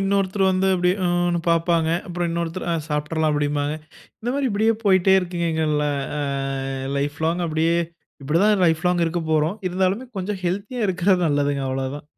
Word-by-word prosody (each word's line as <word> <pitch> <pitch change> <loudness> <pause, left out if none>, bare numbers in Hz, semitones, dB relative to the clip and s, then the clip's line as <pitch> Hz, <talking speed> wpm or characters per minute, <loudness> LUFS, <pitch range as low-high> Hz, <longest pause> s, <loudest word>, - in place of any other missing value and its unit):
இன்னொருத்தரு 195 0 +1
வந்து 190 +1 +1
அப்படியே 180 0 +2
ம்னு 175 0 +1
பார்ப்பாங்க. 165 -1 +2 0.2
அப்பறம் 175 -1 -2
இன்னொருத்தரு 170 +1 -3
"அ - - +1
சாப்பிடறலாம்" 155 +1 0
அப்டிபாங்க. 145 0 0 0.5
இந்த 240 - -2
மாரி 280 -1 0
இப்பிடியே 220 +2 +2
போய்ட்டே 190 -1 +5
இருக்குங்க. 175 -1 -3
எங்க 160 0 0
ல - - 0 0.4
அ - - -1 0.8
லைஃப் 145 +1 -2
லாங் 170 +2 0
அப்படியே. 160 +1 +1 0.5
இப்படி 150 +4 +1
தான் 210 -2 +3
லைஃப் 160 -1 +1
லாங் 180 -1 +2
இருக்கப்போறோம். 160 +1 0
இருந்தாலுமே, 190 +7 0
கொஞ்சம் 190 +1 -3
ஹெல்த்தியா 200 +7 -2
இருக்கிறது 180 0 +2
நல்லதுங்க 145 -1 0
அவ்ளோ 130 0 -2
தான். 145 - -11
175 Hz, 165 wpm, -22 LUFS, 160-190 Hz, 0.8 s, போய்ட்டே